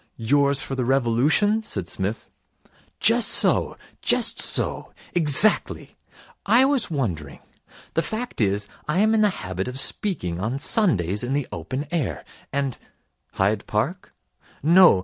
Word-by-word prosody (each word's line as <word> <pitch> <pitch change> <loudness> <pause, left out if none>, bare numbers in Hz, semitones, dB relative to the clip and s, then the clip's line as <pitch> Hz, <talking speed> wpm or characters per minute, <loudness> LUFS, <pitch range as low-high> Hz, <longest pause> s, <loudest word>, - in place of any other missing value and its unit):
'Yours 140 +4 +2
for - - -6
the 130 -1 -1
Revolution?' 135 - +2
said 100 - -4
Psmith. 100 +3 -3 0.7
'Just - - +4
so. - - +2 0.2
Just - - +1
so. - - 0 0.2
Exactly. 175 +5 +2 0.5
I 235 +6 +5
was 270 -6 +1
wondering 90 - -3 0.6
the 165 - +1
fact 220 - -4
is, 100 0 0 0.2
I 150 +3 -1
am 220 +1 +3
in 220 - +3
the 210 - +4 0.2
habit 95 +1 -4
of 125 +1 -5
speaking 90 - -2
on 110 +7 -2
Sundays 105 - +1
in 125 +2 -2
the 145 -1 -1
open 130 - -5
air, 130 - -2 0.3
and 140 -2 -2 0.3
' - - -48
'Hyde 100 +2 0
Park?' 135 - -2 0.5
'No. 170 - +6
135 Hz, 140 wpm, -23 LUFS, -, 0.7 s, No